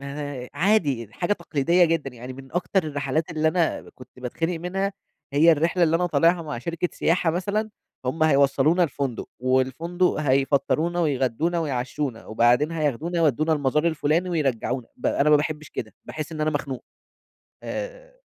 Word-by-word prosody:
ما 140 -2 -6
عادي 150 - +2
دي 105 - -20
حاجة 185 +3 -1
تقليديّة 170 0 +2
جدًا، 160 -4 0
يعني 125 +2 -8
من 135 0 -12
أكتر 180 +2 +1
الرحلات 145 +1 -2
اللي 160 -1 +1
أنا 170 -1 0
كنت 125 -1 -13
باتخِنق 165 +7 -2
منها، 195 +3 -2 0.4
هي 160 +4 +6
الرحلة 165 +3 +1
اللي 165 0 +4
أنا 180 +1 +1
طالعها 170 0 +3
مع 150 -5 -5
شركة 170 +7 -2
سياحة 170 0 +1
مثلًا، 200 +6 -1 0.3
هُم 130 +5 -1
هيوصّلونا 140 +3 +4
الفندق 140 -6 -2
والفندق 130 +8 +1
هيفطّرونا 145 +5 +1
ويغدّونا 145 +3 0
ويعشّونا، 130 -4 -3
وبعدين 120 +8 +3
هياخدونا 155 +2 -1
يودّونا 155 0 +2
المزار 150 +1 +1
الفلاني 160 +3 +1
ويرجّعونا، 130 -6 -1
ب - - -3
أنا 145 +2 +2
ما 150 - +8
باحِبش 150 0 -3
كده، 110 - -6
باحِس 155 +1 -6
إن 155 - -5
أنا 155 0 +2
مخنوق، 140 -3 -4 0.8
آآ - - -7
155 Hz, 155 wpm, -24 LUFS, 135-170 Hz, 0.8 s, ما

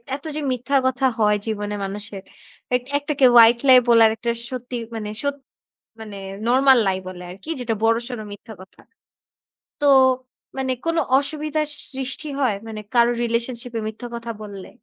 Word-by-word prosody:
এত 280 - -11
যে 305 - -2
মিথ্যা 255 +3 -2
কথা 260 0 +1
হয় 210 -1 +4
জীবনে 210 -1 -3
মানুষের 200 0 -7 0.5
এক 250 - 0
একটাকে 285 -2 +1
"white 235 +1 +7
lie" 255 -1 +8
বলার 230 -1 +7
একটা 235 +1 -2 0.2
সত্যি 250 -1 -6 0.2
মানে 210 -1 -4
সত্যি 285 -1 -3 0.6
মানে 210 -2 -8 0.3
"normal 265 +1 +5
lie" 190 0 0
বলে 180 -1 -8
আরকি 195 - -12
যেটা 235 -2 -1
বড়সড় 230 +1 0
মিথ্যা 220 +2 -10
কথা। 190 - -16 1.0
তো 290 - +1 0.7
মানে 260 -1 0
কোনো 330 0 +2 0.2
অসুবিধার 305 +1 -2 0.3
সৃষ্টি 265 +3 -5
হয় 250 -7 +2
মানে 215 -1 -6
কারো 240 0 +5
রিলেশনশিপ 235 +1 -2
এ - - -2
মিথ্যা 230 +3 -8
কথা 235 0 -6
বললে? 200 -2 -9
235 Hz, 155 wpm, -22 LUFS, 215-265 Hz, 1.0 s, lie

